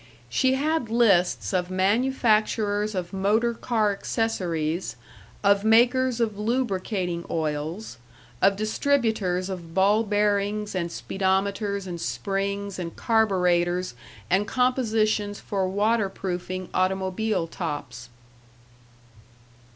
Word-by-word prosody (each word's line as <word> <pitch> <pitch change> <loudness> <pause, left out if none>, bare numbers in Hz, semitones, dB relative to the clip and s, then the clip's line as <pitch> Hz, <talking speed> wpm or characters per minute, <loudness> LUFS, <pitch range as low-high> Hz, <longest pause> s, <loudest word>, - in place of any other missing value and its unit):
She 260 - +2
had 295 -3 0
lists 205 -7 +2
of 180 -1 0
manufacturers 215 0 +1
of 180 0 -4
motor 215 +5 +1
car 225 -3 0
accessories, 180 -6 -2 0.5
of 200 0 +4
makers 245 +3 +4
of 215 -3 -1
lubricating 200 -6 -1
oils, 155 - -3 0.4
of 195 +1 +4
distributors 215 -5 0
of 170 -4 -7
ball 200 +3 +4
bearings 205 0 0
and 175 -2 -2
speedometers 195 +2 -1
and 175 -2 -6
springs 195 +10 -3
and 170 -2 -5
carburetors 180 - +1 0.3
and 195 - +1
compositions 220 -5 +1
for 195 -2 -2
water 205 +2 +1
proofing 185 -1 -5
automobile 190 +1 0
tops. 145 -8 -6
200 Hz, 95 wpm, -25 LUFS, 185-220 Hz, 0.5 s, of